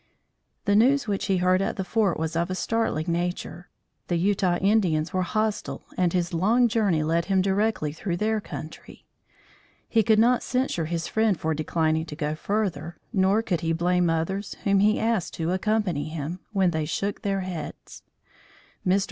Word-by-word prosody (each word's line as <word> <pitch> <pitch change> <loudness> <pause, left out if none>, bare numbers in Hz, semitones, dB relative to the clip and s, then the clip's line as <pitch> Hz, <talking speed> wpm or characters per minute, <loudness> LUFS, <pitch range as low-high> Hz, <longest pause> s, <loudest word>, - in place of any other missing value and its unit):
The 205 - +3
news 260 +4 +4
which 200 -2 -1
he 195 - +2
heard 185 +1 +3
at 195 - -1
the 190 - -2
fort 195 -1 +1
was 160 0 -3
of 170 +2 0
a 185 - -2
startling 205 -5 -1
nature. 175 0 -3 0.4
The 175 - 0
Utah 185 -1 +1
Indians 180 -6 +1
were 185 - +1
hostile 215 +3 -2
and 180 -2 +2
his 175 0 -1
long 225 +9 +3
journey 205 -9 +1
led 165 +2 +1
him 195 -1 +2
directly 195 -4 +1
through 170 +3 -3
their 215 +2 0
country. 155 -5 -9 0.8
He 225 - +3
could 220 +1 +3
not 240 +3 +4
censure 255 -10 -1
his 165 0 -2
friend 220 -5 +1
for 160 0 0
declining 160 +1 0
to 150 - -7
go 150 -1 -2
further, 170 -2 -2 0.2
nor 195 +2 +3
could 175 -7 -1
he 165 0 0
blame 175 +1 +2
others 190 +5 -2
whom 200 -1 +3
he 210 +2 +3
asked 220 -6 0
to 165 +1 -1
accompany 190 -5 0
him, 160 +3 -5
when 190 -4 +2
they 160 -2 -1
shook 195 +6 -3
their 195 -1 -1
heads. 180 -4 -7 0.8
Mr. 190 +2 +3
185 Hz, 175 wpm, -25 LUFS, 165-210 Hz, 0.8 s, news